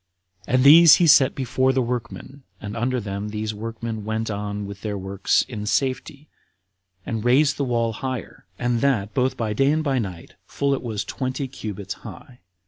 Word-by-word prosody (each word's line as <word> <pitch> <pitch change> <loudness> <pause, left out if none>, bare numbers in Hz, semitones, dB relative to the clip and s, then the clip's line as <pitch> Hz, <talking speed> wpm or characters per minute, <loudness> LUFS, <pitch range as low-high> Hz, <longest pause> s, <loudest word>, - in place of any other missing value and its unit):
And 125 +1 +2
these 160 +3 +9
he 175 - +3
set 140 -3 +5
before 130 0 +1
the 130 - +1
workmen, 125 +3 -6 0.2
and 105 0 -7
under 125 +2 -1
them 100 -1 -5
these 110 0 -4
workmen 115 0 -6
went 110 +1 -2
on 105 0 -4
with 100 0 -9
their 105 -2 -3
works 95 0 0
in 105 -4 -7
safety, 135 +4 -2 0.8
and 115 -2 -3
raised 140 +5 +3
the 140 - -1
wall 115 -2 0
higher, 130 -5 -6
and 120 -1 -1
that 110 -7 0
both 130 0 0
by 110 -2 -2
day 135 +6 +2
and 155 +1 0
by 135 -3 0
night, 95 -7 -6 0.2
till 140 0 0
it 135 - -2
was 110 -4 -4
twenty 130 +1 -3
cubits 100 -6 -6
high. 125 -2 -12
115 Hz, 180 wpm, -23 LUFS, 105-130 Hz, 0.8 s, these